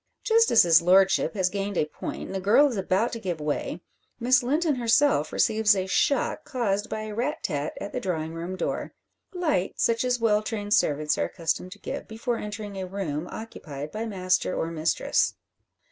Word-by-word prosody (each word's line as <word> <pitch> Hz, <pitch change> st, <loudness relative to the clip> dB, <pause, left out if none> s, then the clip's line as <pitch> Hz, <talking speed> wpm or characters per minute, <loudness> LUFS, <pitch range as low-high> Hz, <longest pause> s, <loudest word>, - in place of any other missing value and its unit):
Just 455 Hz, -1 st, +4 dB
as 220 Hz, -, +7 dB
his 170 Hz, -1 st, +6 dB
lordship 190 Hz, +4 st, +4 dB
has 190 Hz, -3 st, +2 dB
gained 200 Hz, -1 st, -3 dB
a -, -, +2 dB
point 155 Hz, -, -6 dB
and -, -, -7 dB
the 195 Hz, -, -2 dB
girl 220 Hz, +10 st, +5 dB
is 255 Hz, -, -3 dB
about 195 Hz, +4 st, 0 dB
to 230 Hz, -, -5 dB
give 180 Hz, -6 st, -3 dB
way, 150 Hz, +3 st, -3 dB, 0.4 s
Miss 250 Hz, +1 st, +4 dB
Linton 300 Hz, +5 st, +1 dB
herself 235 Hz, -, +2 dB
receives 220 Hz, -1 st, +3 dB
a 190 Hz, -1 st, -1 dB
shock, 280 Hz, +9 st, +1 dB
caused 215 Hz, -5 st, -1 dB
by 215 Hz, -, -3 dB
a 215 Hz, -1 st, -6 dB
rat 255 Hz, +8 st, -2 dB
tat 150 Hz, -5 st, -2 dB
at 200 Hz, -, -6 dB
the 250 Hz, -, -1 dB
drawing 165 Hz, -7 st, -3 dB
room 170 Hz, +3 st, -5 dB
door, 180 Hz, -, -3 dB, 0.4 s
light, 315 Hz, -, -1 dB
such 230 Hz, 0 st, +2 dB
as 250 Hz, -1 st, +1 dB
well 215 Hz, -2 st, +3 dB
trained 210 Hz, -1 st, -3 dB
servants 150 Hz, -3 st, +2 dB
are -, -, +2 dB
accustomed 170 Hz, +2 st, -2 dB
to 205 Hz, -, -18 dB
give -, -, -6 dB
before 230 Hz, +2 st, -3 dB
entering 205 Hz, -1 st, -6 dB
a 185 Hz, -, -4 dB
room 175 Hz, -4 st, -4 dB
occupied 150 Hz, -10 st, -7 dB
by 225 Hz, +2 st, -4 dB
master 185 Hz, -3 st, 0 dB
or 165 Hz, -, -2 dB
mistress. 160 Hz, 0 st, +1 dB
205 Hz, 190 wpm, -26 LUFS, 180-230 Hz, 0.4 s, as